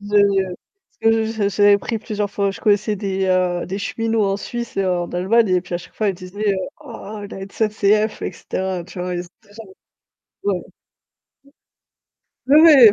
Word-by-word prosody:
Je, 205 +1 -1
heu 195 -2 +3 0.5
parce 225 0 +5
que 225 0 +2
j'avais 205 -3 0
j'avais 205 0 +5
pris 225 +3 -3
plusieurs 210 -2 -3
fois, 200 -1 0
je 195 - -9
connaissais 210 0 +2
des 195 -1 -1
heu, 180 -1 +1
des 195 +2 -4
cheminots 225 +1 0
en 195 0 +1
Suisse 235 +4 -6
et 195 - +1
en 180 -2 0
Allemagne 205 +5 +2
et 185 -1 +3
puis 175 0 -7
à - - 0
chaque - - -14
fois 215 - 0
ils 195 - 0
disaient 195 +3 -3
heu,: 195 - -1 0.2
«Oh 220 -7 -8
la - - -8
SNCF», 210 +1 0
et - - -3
cetera, 185 -2 -4
tu 180 - -11
vois? 180 0 -3
Et 175 - -2
c'était 200 +4 -20
genre 225 0 -10 0.8
Ouais. 410 - +1 1.9
Ouais 295 +4 +7 0.2
mais 210 - +8
200 Hz, 190 wpm, -20 LUFS, 185-215 Hz, 1.9 s, mais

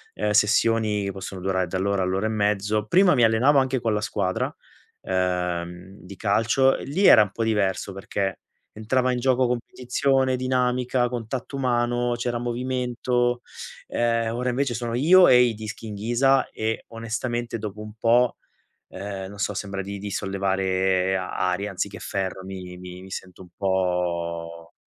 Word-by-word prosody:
Uhm, 105 0 -1
sessioni 105 -1 +2
possono 95 -1 -7
durare 95 -1 0
dall'ora 95 0 0
all'ora 95 +3 0
e - - -1
mezzo. 105 0 0
Prima 180 - +5
mi 120 - +3
allenavo 120 +6 +4
anche 130 -1 0
con 115 -3 0
la 105 - 0
squadra, 95 -3 -1 0.5
uhm, 90 0 -2
di 95 +2 -11
calcio; 115 +6 +2
lì 170 +9 -1
era 110 - +9
un 105 - -6
po' 115 - -2
diverso, 100 -3 0
perché 95 0 -3 0.3
entrava 125 +4 0
in 125 - -1
gioco 130 0 +2
competizione, 130 +2 0
dinamica, 125 -1 +1
contatto 125 +2 -5
umano, 120 -1 +1
c'era 120 0 -2
movimento. 120 0 -1 0.5
Ehm, 115 -1 0
ora 125 +1 -1
invece 125 0 0
sono 115 0 -3
io 175 +8 +6
e 125 -1 +7
i 120 -2 +3
dischi 110 +1 -7
in 105 - -6
ghisa 120 +6 +2
e, 110 +1 -3
onestamente, 115 +1 -3
dopo 105 -1 -6
un 105 0 -9
po', 120 +2 +3 0.5
ehm, 95 0 -6
non 100 - -11
so 105 - -1
sembra 100 0 -4
di 100 +1 -6
di 100 +1 -6
sollevare 95 -1 0
aria 95 +1 -1
anziché 100 +1 -4
ferro 95 -1 -3
mi 95 -1 -8
mi 90 0 -9
mi 95 - -12
sento 95 0 -8
un 90 - -16
po' 85 -3 -2
105 Hz, 155 wpm, -24 LUFS, 95-120 Hz, 0.5 s, era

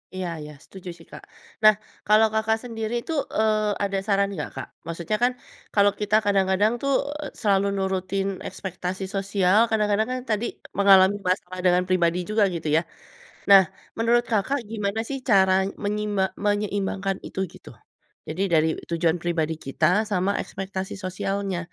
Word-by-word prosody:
Iya 185 -1 -3
iya 150 0 -9
setuju 190 -1 -10
sih, - - -16
Kak. - - -10 0.4
Nah 215 0 +9 0.3
kalau 215 +1 +6
Kakak 220 0 +1
sendiri 225 -2 -4
itu, 325 - -5 0.2
eee, 215 -1 +2
ada 195 -1 -1
saran 200 -1 +2
nggak, 150 -6 -4
Kak? - - -6 0.2
Maksudnya 170 +5 -2
kan 250 - +4 0.4
kalau 205 -1 +5
kita 210 0 +1
kadang-kadang 200 +2 +2
tuh, 275 0 +1 0.5
selalu 200 -2 +3
nurutin 190 0 -1 0.2
ekspektasi 185 0 -5
sosial, 195 0 +2
kadang-kadang 215 0 +1
kan 255 - -2
tadi 215 +2 0 0.3
mengalami 195 0 +6
masalah 185 0 -2
dengan 180 0 +4
pribadi 175 -2 +2
juga 215 0 +3
gitu 160 -2 -4
ya. - - +3 0.7
Nah 195 -1 +10 0.4
menurut 235 +1 +3
Kakak 230 +7 +1
gimana 210 0 -2
sih 275 - -2
cara 190 -3 +5 0.3
menyime 205 -1 0 0.2
menyeimbangkan 200 -2 -1
itu - - -7
gitu? - - -13 0.6
Jadi 160 +4 -4
dari 160 0 +4 0.2
tujuan 170 0 +1
pribadi 165 -2 -1
kita 135 - 0 0.3
sama 185 0 +1
ekspektasi 190 0 -5
sosialnya, 195 0 -3
195 Hz, 145 wpm, -24 LUFS, 185-210 Hz, 0.7 s, Nah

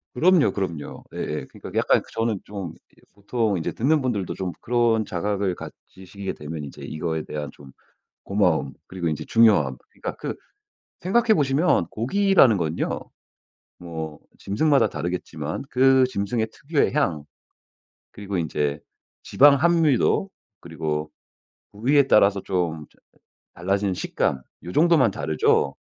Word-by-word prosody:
그럼요, 170 +3 +4
그럼요. 85 -7 -5
예예. 75 - -4
그러니까 - - -11
약간 - - +3
저는 115 -3 -1
좀 95 -6 -7
이 - - -27
보통 105 -1 -1
이제 80 - -2
듣는 150 +6 +1
분들도 105 -9 -2
좀 90 0 -4
그런 115 -2 +1
자각을 95 0 -1
가지시게 95 +1 -8
되면 75 +1 -7
인제 70 - -10
이거에 80 0 -3
대한 75 -1 -5
좀 70 -2 -15 0.5
고마움 90 -9 +1
그리고 90 -3 -3
인제 75 - -3
중요함 100 - +4
그러니까 - - -6
그 - - -4 0.7
생각해 220 +4 +3
보시면 140 - +2
고기라는 135 - +3
건요. 80 -1 -2 0.8
뭐 80 -3 -7 0.2
짐승마다 140 +9 +2
다르겠지만 80 -1 -4
그 130 +1 +5
짐승의 110 +1 -1
특유의 145 0 0
향 85 - 0 0.9
그리고 100 -2 -5
인제 75 -3 -1 0.4
지방 140 +1 +6
함유도 165 +3 +2 0.3
그리고 80 -2 -4 0.6
부위에 135 +7 +3
따라서 100 -1 +4
좀 85 -5 -2
어 - - -21 0.4
달라지는 95 +1 0
식감 65 -6 -1 0.2
요 90 - -6
정도만 155 -8 +4
다르죠. 75 -5 +1
100 Hz, 295 characters per minute, -24 LUFS, 80-130 Hz, 0.9 s, 지방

